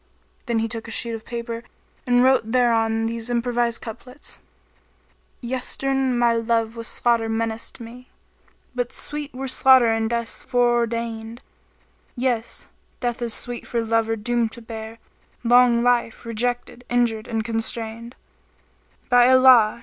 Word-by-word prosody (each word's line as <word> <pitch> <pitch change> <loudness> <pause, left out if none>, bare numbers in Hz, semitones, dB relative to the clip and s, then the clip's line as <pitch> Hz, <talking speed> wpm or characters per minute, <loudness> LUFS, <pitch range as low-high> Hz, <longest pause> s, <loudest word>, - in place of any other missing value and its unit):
Then 235 -1 0
he 225 0 0
took 225 0 -5
a - - -8
sheet 235 +1 -2
of 225 -1 -7
paper 235 -1 -5 0.4
and 245 0 +4
wrote 260 -4 +3
thereon 225 -2 +2
these 230 +1 -3
improvised 240 -1 0
couplets, 250 +4 -9 1.0
"Yestre'en 260 +1 -1
my 240 -1 +3
love 230 0 0
with 230 0 -4
slaughter 235 -2 +1
menaced 225 0 -3
me, 240 +2 -11 0.3
* - - -37
But 245 -1 -3
sweet 295 0 -3
were 265 +1 -5
slaughter 260 -1 +6
and 225 0 0
Death's 235 -1 -3
foreordainčd: 235 -1 0 0.7
Yes, 240 -2 -2 0.3
Death 245 -1 -2
is 235 -2 -1
sweet 245 -1 -5
for 235 -1 -1
lover 225 0 +1
doomed 230 +1 -1
to 235 - -11
bear 225 0 -8 0.3
* - - -37
Long 240 0 +5
life, 245 -1 +1
rejected, 245 +1 -3
injured 235 -3 0
and 225 -2 -2
constrainčd: 225 +1 -4 0.9
By 245 0 +5
Allah! 255 -4 +6
235 Hz, 140 wpm, -23 LUFS, 225-245 Hz, 1.0 s, slaughter